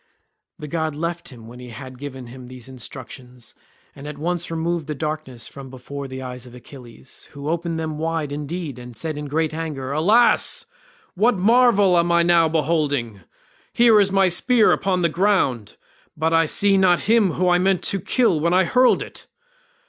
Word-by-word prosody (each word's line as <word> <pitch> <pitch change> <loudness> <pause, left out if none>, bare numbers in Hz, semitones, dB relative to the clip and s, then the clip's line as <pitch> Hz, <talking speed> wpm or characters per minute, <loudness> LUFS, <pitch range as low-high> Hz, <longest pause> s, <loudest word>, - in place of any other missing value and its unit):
The 150 - -8
god 160 -1 -2
left 170 +2 -4
him 120 -4 -13
when 120 +2 -12
he 125 0 -10
had 130 +2 -10
given 135 -3 -8
him 125 +1 -11
these 125 -1 -11
instructions, 125 -1 -10 0.4
and 140 +1 -10
at 150 -1 -7
once 175 +3 -3
removed 165 -1 -2
the 150 - -4
darkness 150 -5 -5
from 135 -1 -11
before 135 +2 -8
the 130 0 -7
eyes 125 0 -8
of 125 - -13
Achilles, 125 0 -12
who 145 0 -8
opened 165 0 -2
them 155 -1 -4
wide 160 -2 -2
indeed 150 -1 -5
and 125 -1 -11
said 155 +5 -4
in 150 0 -6
great 155 +2 -1
anger, 150 -5 -5
"Alas! 205 +12 +3 0.5
what 220 +3 +2
marvel 205 -3 +4
am 170 0 +1
I 170 0 +4
now 170 -1 +4
beholding? 145 - -1 0.5
Here 235 -3 +5
is 200 -1 +2
my 195 -1 +3
spear 225 +6 +3
upon 185 -2 0
the - - +4
ground, 160 - 0 0.4
but 160 +2 0
I 165 -1 +3
see 200 +4 +3
not 180 -2 +3
him 215 -5 +2
whom 180 +1 +1
I 175 0 +3
meant 190 0 +1
to 195 - -1
kill 230 -6 +1
when 170 +3 +1
I 190 - +4
hurled 250 +8 +3
it. - - -12
160 Hz, 185 wpm, -21 LUFS, 130-180 Hz, 0.5 s, Here